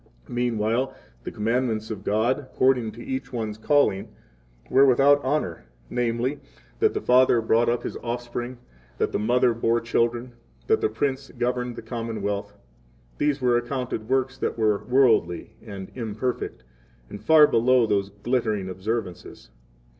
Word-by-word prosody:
Meanwhile 120 Hz, +2 st, 0 dB, 0.3 s
the -, -, -3 dB
commandments 110 Hz, 0 st, -1 dB
of 100 Hz, -3 st, -6 dB
God, 110 Hz, +7 st, +1 dB
according 130 Hz, -4 st, +1 dB
to -, -, -12 dB
10 -, -, -10 dB
each 265 Hz, 0 st, -4 dB
one's 110 Hz, -3 st, -4 dB
calling, 140 Hz, -7 st, +2 dB, 0.6 s
were 135 Hz, -, +5 dB
without 140 Hz, +3 st, +5 dB
honor 130 Hz, -, -2 dB, 0.3 s
namely, 120 Hz, +3 st, -1 dB, 0.4 s
that -, -, +2 dB
the -, -, -1 dB
father 125 Hz, -1 st, +4 dB
brought 115 Hz, +1 st, +2 dB
up 120 Hz, 0 st, -1 dB
his -, -, -5 dB
offspring, 120 Hz, +1 st, -5 dB, 0.4 s
that -, -, 0 dB
the -, -, -1 dB
mother 120 Hz, +3 st, +3 dB
bore 115 Hz, 0 st, +1 dB
children, 120 Hz, +1 st, -1 dB, 0.3 s
that 440 Hz, 0 st, +2 dB
the 430 Hz, -, +2 dB
prince 135 Hz, -, -2 dB
governed 125 Hz, 0 st, -1 dB
the -, -, -8 dB
commonwealth,—these 100 Hz, -, -5 dB
were 125 Hz, -1 st, +3 dB
accounted 120 Hz, -3 st, -4 dB
works 130 Hz, 0 st, 0 dB
that -, -, -2 dB
were 105 Hz, -2 st, +1 dB
worldly 120 Hz, -10 st, +2 dB
and 100 Hz, -4 st, -8 dB
imperfect, 115 Hz, -, -4 dB, 0.4 s
and 100 Hz, -, -9 dB
far 160 Hz, -1 st, +7 dB
below 125 Hz, -2 st, +3 dB
those 100 Hz, -2 st, 0 dB
glittering 105 Hz, -2 st, -1 dB
observances. 95 Hz, 0 st, -5 dB
120 Hz, 140 wpm, -25 LUFS, 110-130 Hz, 0.6 s, far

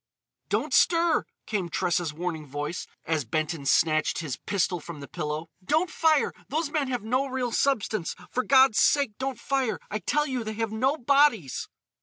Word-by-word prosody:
"Don't -, -, -1 dB
stir!" 335 Hz, -1 st, +4 dB, 0.2 s
came 195 Hz, -5 st, -2 dB
Tressa's 175 Hz, -3 st, 0 dB
warning 160 Hz, -1 st, -4 dB
voice, 145 Hz, +5 st, -4 dB, 0.2 s
as 160 Hz, -2 st, 0 dB
Benton 155 Hz, +3 st, -2 dB
snatched 155 Hz, +1 st, +3 dB
his 155 Hz, -6 st, -3 dB
pistol 185 Hz, +1 st, -1 dB
from 165 Hz, -1 st, -9 dB
the 140 Hz, -, -8 dB
pillow. 155 Hz, 0 st, -4 dB
"Don't 315 Hz, -, +1 dB
fire! 315 Hz, -2 st, +2 dB, 0.2 s
Those 310 Hz, 0 st, -1 dB
men 295 Hz, -3 st, 0 dB
have 245 Hz, -4 st, -2 dB
no 255 Hz, +5 st, 0 dB
real 255 Hz, -2 st, -2 dB
substance! 220 Hz, -9 st, 0 dB, 0.2 s
For 255 Hz, -, 0 dB
God's 265 Hz, -4 st, +5 dB
sake 285 Hz, -6 st, +3 dB
don't 265 Hz, -1 st, -2 dB
fire! 270 Hz, -4 st, -1 dB
I 215 Hz, -, -1 dB
tell 295 Hz, +10 st, +1 dB
you 260 Hz, -4 st, -2 dB
they 215 Hz, 0 st, -4 dB
have 225 Hz, 0 st, -2 dB
no 260 Hz, +7 st, +1 dB
bodies!" 260 Hz, -, +2 dB
220 Hz, 170 wpm, -27 LUFS, 165-275 Hz, 0.2 s, God's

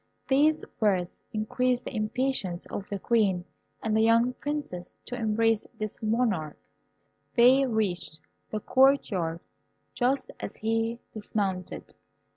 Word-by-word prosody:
These 300 Hz, +3 st, +3 dB
words 190 Hz, -6 st, +1 dB
increased 250 Hz, +3 st, 0 dB
the -, -, -6 dB
impatience 215 Hz, -4 st, -1 dB
of 200 Hz, -, -6 dB
the 200 Hz, -, -2 dB
Queen 195 Hz, -5 st, +1 dB, 0.4 s
and 220 Hz, -1 st, +1 dB
the 220 Hz, -, +4 dB
young 230 Hz, +2 st, +4 dB
Princess 280 Hz, -12 st, -5 dB
to 245 Hz, -, -4 dB
embrace 225 Hz, -1 st, +1 dB
this 215 Hz, -1 st, -4 dB
monarch. 215 Hz, -9 st, 0 dB, 0.8 s
They 260 Hz, +3 st, +6 dB
reached 200 Hz, -8 st, -1 dB, 0.3 s
the 215 Hz, -, -3 dB
court 270 Hz, +2 st, +4 dB
yard 170 Hz, -3 st, -2 dB, 0.5 s
just 260 Hz, +2 st, 0 dB
as -, -, -5 dB
he 225 Hz, +1 st, 0 dB, 0.2 s
dismounted. 200 Hz, -4 st, -3 dB
220 Hz, 120 wpm, -28 LUFS, 200-250 Hz, 0.8 s, They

